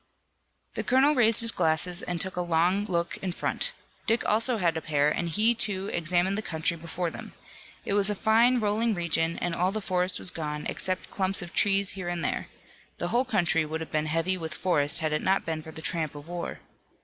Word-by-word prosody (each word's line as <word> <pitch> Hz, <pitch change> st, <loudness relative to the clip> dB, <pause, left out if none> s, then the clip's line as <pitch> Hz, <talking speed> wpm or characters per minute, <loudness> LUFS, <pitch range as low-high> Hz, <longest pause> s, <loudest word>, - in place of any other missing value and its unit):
The -, -, -3 dB
colonel 265 Hz, +4 st, +4 dB
raised 230 Hz, -4 st, +3 dB
his 230 Hz, 0 st, +4 dB
glasses 170 Hz, 0 st, 0 dB
and 175 Hz, -1 st, -4 dB
took 190 Hz, +1 st, 0 dB
a 180 Hz, -, -1 dB
long 175 Hz, +4 st, +1 dB
look 170 Hz, -3 st, -2 dB
in 190 Hz, -, -4 dB
front. -, -, -1 dB, 0.4 s
Dick 230 Hz, +2 st, +1 dB
also 230 Hz, +3 st, +2 dB
had 170 Hz, -5 st, +1 dB
a 160 Hz, -, -2 dB
pair 150 Hz, -2 st, +1 dB
and 170 Hz, +2 st, -2 dB
he, 215 Hz, +8 st, +3 dB
too, 200 Hz, -4 st, 0 dB
examined 175 Hz, +4 st, +1 dB
the -, -, -2 dB
country 165 Hz, -3 st, -1 dB
before 170 Hz, +1 st, -4 dB
them. -, -, -10 dB, 0.5 s
It -, -, -1 dB
was 200 Hz, 0 st, +3 dB
a 210 Hz, -, 0 dB
fine, 230 Hz, +5 st, +3 dB
rolling 215 Hz, +1 st, 0 dB
region 165 Hz, -1 st, 0 dB
and 175 Hz, -1 st, -2 dB
all 180 Hz, +2 st, +1 dB
the 215 Hz, -, -2 dB
forest 185 Hz, -2 st, +1 dB
was 180 Hz, -, +1 dB
gone, 150 Hz, -2 st, -4 dB
except 185 Hz, 0 st, 0 dB
clumps 190 Hz, -1 st, 0 dB
of 175 Hz, -, -10 dB
trees 200 Hz, -1 st, +3 dB
here 185 Hz, -3 st, -5 dB
and 175 Hz, -1 st, -3 dB
there. -, -, -2 dB, 0.5 s
The -, -, -2 dB
whole 250 Hz, +2 st, +1 dB
country 175 Hz, -9 st, +1 dB
would 155 Hz, +1 st, -4 dB
have 160 Hz, -, -7 dB
been 155 Hz, 0 st, 0 dB
heavy 165 Hz, +4 st, 0 dB
with 160 Hz, -1 st, -5 dB
forest 145 Hz, -5 st, +1 dB
had 155 Hz, -1 st, -1 dB
it 155 Hz, -, 0 dB
not 195 Hz, +1 st, +1 dB
been 160 Hz, -1 st, -3 dB
for 160 Hz, -, -10 dB
the 160 Hz, 0 st, -8 dB
tramp 160 Hz, -4 st, -2 dB
of 145 Hz, +1 st, -10 dB
war. 175 Hz, 0 st, -6 dB
180 Hz, 220 wpm, -27 LUFS, 165-205 Hz, 0.5 s, colonel